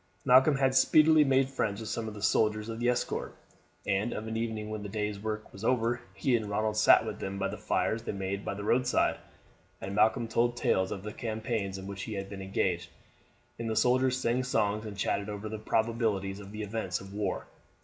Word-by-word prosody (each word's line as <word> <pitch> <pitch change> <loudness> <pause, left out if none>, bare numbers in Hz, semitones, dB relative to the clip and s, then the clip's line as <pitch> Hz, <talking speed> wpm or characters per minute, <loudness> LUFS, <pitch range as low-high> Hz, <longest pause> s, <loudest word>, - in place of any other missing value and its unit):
Malcolm 130 +3 +6
had 135 -1 +2
speedily 155 +3 +6
made 135 -1 +3
friends 110 -6 -2
with 110 - -6
some 115 +1 -3
of 110 - -6
the 105 - -8
soldiers 105 +1 +2
of 115 0 -5
the 120 +1 +2
escort, 125 - -2 0.5
and 100 +4 0
of 110 +1 -5
an 110 - -4
evening 110 -2 -3
when 110 -1 -4
the 100 - -6
day's 105 -1 -3
work 110 0 -5
was 95 - -10
over 120 0 +1
he 120 +6 +2
and 110 -3 -2
Ronald 110 +1 0
sat - - +6
with - - -5
them 95 0 -4
by 100 - 0
the - - -5
fires 115 - 0
they - - -4
made 100 0 -3
by - - -3
the 100 - -6
roadside, 125 +4 +2 0.6
and 95 +1 -5
Malcolm 110 +2 +3
told 120 +1 +1
tales 95 -4 +1
of 95 - -5
the 105 0 -6
campaigns 110 -3 -3
in 95 - -8
which 100 0 -6
he 110 - -5
had 95 0 -5
been 100 -1 -6
engaged, 90 -3 -1 0.7
and 115 -1 -3
the 110 - -1
soldiers 125 +3 +3
sang 125 0 0
songs 110 -3 0
and 100 -2 -8
chatted 100 +1 -1
over 105 +1 -5
the 110 0 -5
probabilities 110 -3 0
of 100 0 -10
the 105 0 -5
events 105 -4 -3
of 95 0 -11
the 100 - -8
war. 100 -3 -2
110 Hz, 220 wpm, -30 LUFS, 100-115 Hz, 0.7 s, Malcolm